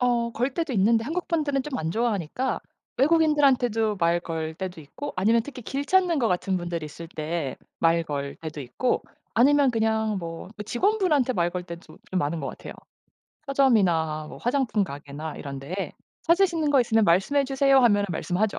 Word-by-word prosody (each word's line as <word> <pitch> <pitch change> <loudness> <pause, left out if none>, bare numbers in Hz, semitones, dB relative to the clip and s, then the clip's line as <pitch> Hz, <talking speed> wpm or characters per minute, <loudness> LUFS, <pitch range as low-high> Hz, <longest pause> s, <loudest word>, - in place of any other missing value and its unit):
어 240 -1 +1
걸 250 +4 -1
때도 325 -5 -2
있는데 225 +3 +3
한국분들은 305 -3 -1
좀 285 -2 -4
안 160 +1 -2
좋아하니까 225 +2 -1 0.4
외국인들한테도 270 -8 +3
말 170 0 +2
걸 160 -2 -4
때도 180 -2 -6
있고 255 - -7
아니면 225 +5 +3
특히 260 -2 -9
길 275 +5 -3
찾는 365 -2 +3
것 230 - +2
같은 185 +1 0
분들이 170 -2 -4
있을 165 +2 -10
때 155 -3 -3 0.2
말 165 0 +3
걸 140 -2 -4
때도 155 -2 -6
있고 135 - -1 0.3
아니면 275 +2 +5
그냥 220 -2 0
뭐 165 0 -7
그 210 - -6
직원 395 - +1
분한테 295 -9 +2
말 175 -1 +1
걸 180 0 -4
때 170 -1 -7
좀 - - -17
이 - - -1
많은 165 -1 0
것 135 - -3
같아요. - - -8 0.7
서점이나 180 - +2
뭐 - - -10
화장품 245 -5 +1
가게나 145 +1 -7
이런 140 -2 -6
데에 185 +8 -4 0.3
"찾으시는 335 -3 +2
거 275 -3 +5
있으면 225 -2 +3
말씀해 195 +12 +3
주세요." 270 0 +3
하면은 205 -5 +4
말씀하죠. 180 +5 -1
220 Hz, 370 characters per minute, -25 LUFS, 170-270 Hz, 0.7 s, 아니면